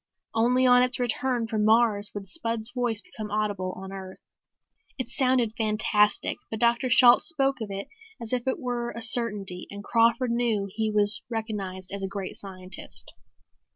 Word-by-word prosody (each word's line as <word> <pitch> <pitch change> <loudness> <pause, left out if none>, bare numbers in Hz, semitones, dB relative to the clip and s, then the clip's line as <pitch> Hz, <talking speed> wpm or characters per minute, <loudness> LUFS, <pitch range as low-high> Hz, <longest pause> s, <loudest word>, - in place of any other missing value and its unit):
Only 245 +3 +2
on 250 0 +6
its 250 0 +1
return 245 0 -1
from 220 -2 -2
Mars 215 -2 +3
would 200 -1 -6
Spud's 230 - -2
voice 240 -4 -1
become 215 -2 -9
audible 205 -3 -2
on 190 +1 -9
Earth. 190 -1 -9 0.8
It 255 -4 -4
sounded 255 -3 0
fantastic 215 -1 +1
but 220 - -5
Dr. 235 +2 +2
Shalt 245 +1 +6
spoke 275 -5 -1
of 215 - -5
it 195 0 -6 0.3
as 230 +1 -4
if 250 0 -2
it 260 - 0
were 245 -4 -4
a 235 - -7
certainty 210 -6 +4
and 200 0 -9
Crawford 235 +3 +2
knew 230 -4 0
he 215 +3 -3
was 210 0 +4
recognized 200 -5 -5
as 200 0 -5
a 195 - -3
great 195 -1 -6
scientist. 185 -1 -7
220 Hz, 165 wpm, -25 LUFS, 205-245 Hz, 0.8 s, on